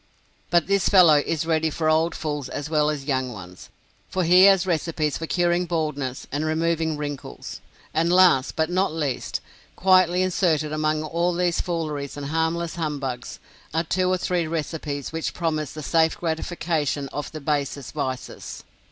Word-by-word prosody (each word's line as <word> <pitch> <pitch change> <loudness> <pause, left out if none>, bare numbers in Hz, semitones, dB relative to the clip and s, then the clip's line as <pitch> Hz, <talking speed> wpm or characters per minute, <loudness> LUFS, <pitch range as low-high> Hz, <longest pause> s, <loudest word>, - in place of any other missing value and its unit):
But 175 -2 +3
this 200 0 +2
fellow 170 -7 +7
is 165 -1 -1
ready 160 -1 +1
for 155 +1 -2
old 160 +2 +2
fools 150 -4 -4
as 145 +2 -5
well 150 -1 +3
young 135 -3 -2
ones, 90 -4 -11 0.4
for 185 - 0
he 180 +3 +7
has 195 -2 +5
recipes 160 -4 -1
for 165 - -4
curing 175 0 +1
baldness 150 -6 -2
and 145 +2 -1
removing 160 0 0
wrinkles. 145 - -6 0.3
And 165 +2 +2
last, 180 -8 +5
but 160 +2 0
not 185 0 +1
least, 150 -5 -3 0.3
quietly 185 -1 +4
inserted 160 -5 +1
among 155 0 0
all 170 +3 0
these 175 -1 +1
fooleries 155 -5 -3
and 145 -1 -5
harmless 165 +1 -1
humbugs, 140 -6 -4 0.4
are 165 - +2
two 185 +2 0
or 185 - +2
three 175 -2 -1
recipes 155 -3 -4
which 160 0 -3
promise 155 -4 -1
the 155 - -7
safe 160 +2 +2
gratification 160 -4 -2
of 145 +2 -5
the 155 - -6
basest 140 -3 -2
vices. 130 -4 -5
160 Hz, 160 wpm, -24 LUFS, 145-170 Hz, 0.4 s, fellow